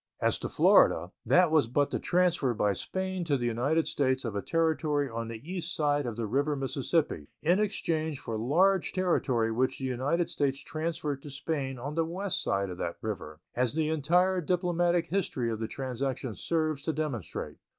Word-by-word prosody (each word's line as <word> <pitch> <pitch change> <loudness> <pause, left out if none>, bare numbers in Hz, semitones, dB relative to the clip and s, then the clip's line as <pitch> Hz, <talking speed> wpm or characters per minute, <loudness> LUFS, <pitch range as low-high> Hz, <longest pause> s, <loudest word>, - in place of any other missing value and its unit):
As - - +1
to - - -4
Florida, 85 +3 +4 0.2
that 180 -2 +5
was 155 -7 +4
but 140 +4 +1
the - - -1
transfer 175 -8 +2
by 105 -1 +2
Spain 190 - -3
to 145 -4 +2
the 120 - -2
United 135 +8 +1
States 130 -2 0
of 115 - -2
territory 155 -3 +1
on 115 -2 -4
the 115 -1 -6
east 180 -1 -3
side 145 -3 +1
of 115 - -3
the 115 0 -2
river 140 +7 +1
Mississippi 135 - -1 0.2
in 175 +5 +4
exchange 160 -8 -1
for 115 - -5
large 170 - +2
territory 135 -11 +1
which 130 +3 0
the 135 - -4
United 135 +7 0
States 135 -1 0
transferred 155 -3 -3
to 145 - -9
Spain 140 -2 -3
on 140 +5 -5
the 165 +1 +1
west 185 +4 -2
side 100 -1 0
of 90 - -8
that 85 - -3
river, 80 -8 -5
as 125 +1 +1
the 155 -1 +1
entire 175 +5 +2
diplomatic 175 0 +1
history 165 -11 -1
of 110 - -3
the 110 - -2
transaction 130 -1 -3
serves 155 +2 -1
to 160 +2 -2
demonstrate. 145 - -4
145 Hz, 180 wpm, -29 LUFS, 120-165 Hz, 0.2 s, that